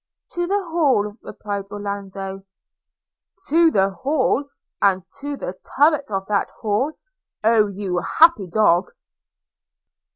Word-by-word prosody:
'To 350 0 -2
the 400 +2 +1
Hall,' 265 -11 +2
replied 200 -1 -5
Orlando. 195 -1 -6 1.1
'To 330 +2 +5
the 195 -8 +2
Hall! 275 +5 0 0.2
– - - -59
and 190 -2 +3 0.2
to 285 0 -5
the 185 - -5 0.2
turret 295 -1 +3
of 195 -2 -2
that 200 -1 0
Hall! 225 +8 0 0.3
– - - -61
Oh! 220 -1 +4
you 195 -2 -3 0.2
happy 320 - +6
dog!' 180 -2 +2
210 Hz, 125 wpm, -21 LUFS, 195-285 Hz, 1.1 s, happy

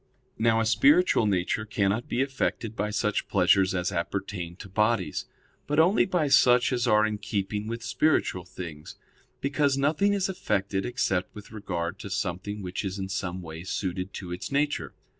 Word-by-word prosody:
Now 115 0 +3
a 115 - +1
spiritual 140 +3 +4
nature 95 +2 0
cannot 105 +1 0
be 125 - +1
affected 120 -4 -2
by 105 -1 -1
such 105 0 -1
pleasures 95 0 +3
as 90 -1 -1
appertain 85 0 -3
to 100 - -10
bodies, 100 -4 0 0.4
but 150 - -1
only 180 +5 +5
by 180 -5 0
such 125 -2 +5
as 120 0 0
are 105 -1 +5
in 105 -1 -2
keeping 105 0 -3
with 115 0 -5
spiritual 120 - +1
things; 85 -5 -8 0.5
because 140 0 +1
nothing 155 +9 +2
is 195 -2 +1
affected 100 - -1
except 95 -7 -1
with 105 -1 -11
regard 95 -4 -4
to 100 - -7
something 100 +2 -3
which 90 +2 -4
is 95 0 -3
in 95 -1 -4
some 95 -1 -3
way 80 0 -8
suited 95 0 -3
to 90 -3 -6
its 90 +8 -5
nature. 145 +1 -1
105 Hz, 170 wpm, -27 LUFS, 95-125 Hz, 0.5 s, only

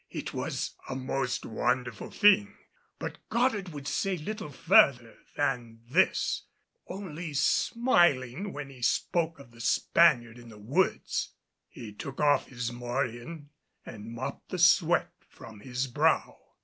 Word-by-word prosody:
It - - -6
was - - -3 0.2
a 130 - -3
most 130 -1 -2
wonderful 125 +3 -2
thing; 205 -1 +4 0.4
but - - -6
Goddard 230 -6 +1
would 145 -3 -8
say 195 +3 -1
little 210 +2 -5
further 125 -3 +4 0.2
than 120 -5 -2
this, - - +2 0.4
only 170 -5 -6
smiling 175 - +2
when 145 -3 -7
he 130 -2 -14
spoke 160 +6 0
of 140 -4 -15
the 115 0 -13
Spaniard 120 -3 +3
in 120 -1 -13
the 110 - -13
woods. 135 - -1 0.4
He 110 -3 -10
took 135 +6 -8
off 145 -1 +3
his 125 -2 -4
morion 120 +5 -4 0.3
and 110 -1 -9
mopped 120 +3 -6
the 185 - -3
sweat 170 0 +4 0.2
from 110 - -13
his 125 +4 -3
brow. 125 - +1
135 Hz, 135 wpm, -29 LUFS, 120-170 Hz, 0.4 s, thing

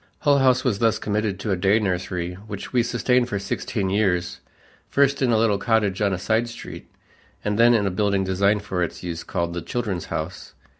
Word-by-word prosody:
Hull 145 -2 +4
House 130 -1 +3
was 110 -7 0
thus 115 -2 +2
committed 105 -2 -2
to 105 - -2
a - - +2
day 95 +3 +3
nursery 90 -3 -2
which 100 +3 -8
we 125 - +4
sustained 120 +1 +1
for 105 - -1
sixteen 100 0 -2
years 95 -4 0 0.5
first 140 0 +2
in 130 - +2
a 115 - +4
little 110 -3 +2
cottage 105 -3 +1
on 100 -1 +2
a 95 - -1
side 110 +5 0
street 115 - -9 0.6
and 105 0 0
then 120 +1 +6
in 105 -3 +2
a 100 - 0
building 100 0 +1
designed 100 +2 +1
for 95 -3 -3
its 85 0 -3
use 85 -2 -4
called 85 -2 -2
the 85 - -4
Children's 100 -3 -3
House. 85 +4 -6
100 Hz, 205 wpm, -23 LUFS, 95-115 Hz, 0.6 s, then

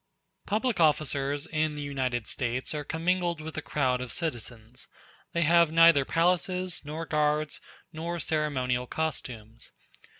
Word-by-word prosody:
Public 220 +1 0
officers 145 -2 +2
in 155 -2 -1
the 150 - -5
United 130 -5 -2
States 125 +2 -2
are 150 -1 -3
commingled 170 +2 0
with 155 0 -7
the 155 - -4
crowd 130 -4 0
of 125 - -5
citizens; 120 -7 -5 0.4
they 170 - +1
have 170 0 +5
neither 165 -4 +6
palaces, 180 +2 0
nor 155 +3 -5
guards, 150 -1 0 0.3
nor 170 +2 -4
ceremonial 130 -6 0
costumes. 120 -8 -5
150 Hz, 130 wpm, -28 LUFS, 130-165 Hz, 0.4 s, neither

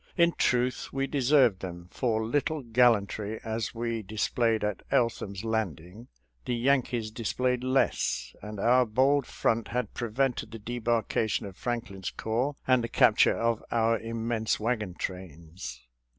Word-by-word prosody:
In 170 -1 +5
truth, 125 -4 0
we 135 0 -1
deserved 135 -6 +3
them, 85 -2 -7
for 110 -3 0
little 145 +4 -1
gallantry 110 -3 +2
as 110 +1 -3
we 115 -1 -2
displayed 110 +2 0
at 105 -2 -2
Eltham's 105 -4 0
Landing, 110 -1 -3 0.4
the 120 - -1
Yankees 120 -3 +1
displayed 125 +2 -1
less, 65 - 0
and 105 0 -7
our 125 +4 +5
bold 135 +5 +2
front 115 0 0
had 125 -4 -3
prevented 120 0 -1
the 115 - -8
debarkation 115 -1 -1
of 95 -2 -8
Franklin's 110 -5 -4
corps 120 +7 -2
and 130 -2 +3
the - - -1
cap - - +5
ture - - +5
of 115 -1 0
our 115 -1 +2
immense 115 0 -1
wagon 105 -5 -1
trains. 80 -9 -7
115 Hz, 140 wpm, -28 LUFS, 105-125 Hz, 0.4 s, In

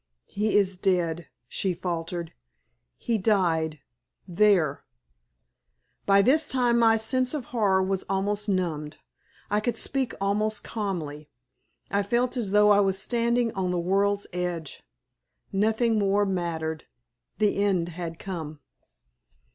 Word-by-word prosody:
"He 210 +1 0
is 190 -2 +2
dead," 175 -4 0 0.2
she 185 +7 -1
faltered. 170 -1 -4 0.6
"He 230 -2 -1
died 165 -7 +1 0.5
there!" 175 -6 +2 1.2
By 200 0 +5
this 295 +6 +4
time 245 -2 +2
my 225 -1 +5
sense 255 +5 0
of 275 -5 -4
horror 195 -5 +2
was 190 0 -1
almost 205 +2 -1
numbed. 160 -6 -2 0.5
I 210 - +3
could 235 +3 -2
speak 265 -3 0
almost 210 +2 0
calmly. 155 -9 -4 0.6
I 200 +1 +2
felt 240 +5 0
as 235 -6 -2
though 210 +1 +5
I 205 - +5
was 195 -1 +2
standing 235 +2 0
on 190 -2 -2
the 180 - -1
world's 200 +3 +1
edge. 175 -4 -4 0.7
Nothing 220 +3 +1
more 200 0 +2
mattered. 165 -4 -3 0.5
The 210 -2 +1
end 180 -4 +1
had 165 -1 -6
come. 160 -6 -6
195 Hz, 125 wpm, -26 LUFS, 175-215 Hz, 1.2 s, By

